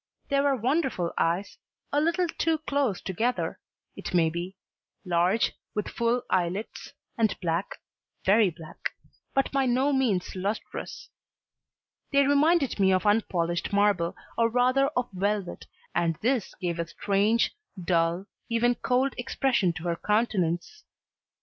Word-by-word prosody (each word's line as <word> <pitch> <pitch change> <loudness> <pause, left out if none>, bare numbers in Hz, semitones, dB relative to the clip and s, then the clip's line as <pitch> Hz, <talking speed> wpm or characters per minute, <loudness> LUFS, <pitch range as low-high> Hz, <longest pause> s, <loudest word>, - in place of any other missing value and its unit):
They 280 - +2
were 280 -1 +3
wonderful 255 - 0
eyes, 175 +5 -1 0.3
a 290 - +3
little 340 +3 +1
too 325 0 0
close 280 - 0
together, 230 +7 -1 0.4
it - - -5
may 165 -2 +4
be, 175 +3 -5 0.5
large, 180 +5 +2 0.2
with 210 - -1
full 235 +1 0
eyelids, 185 +4 -2 0.3
and 220 -2 +2
black, 170 +1 -2 0.5
very 205 +1 +5
black, 165 -2 -7 0.4
but 270 - +2
by 275 -1 +2
no 260 +4 +2
means 230 -11 0
lustrous; 195 +4 -4 1.0
they 280 0 +4
reminded 285 -2 +3
me 190 -1 +4
of 185 +2 +2
unpolished 175 -5 +1
marble, 200 -4 +2 0.2
or 230 0 +4
rather 255 +3 +3
of 250 -1 +1
velvet, 200 0 -2 0.3
and 170 -1 +1
this 245 -2 0
gave 175 -2 -3
a 170 - -1
strange, 200 +7 +1 0.2
dull, 170 +1 +1 0.2
even 235 +1 +3
cold 255 +2 +1
expression 245 -6 +1
to 165 -1 -8
her 170 -1 0
countenance. 210 - 0
210 Hz, 130 wpm, -27 LUFS, 180-255 Hz, 1.0 s, very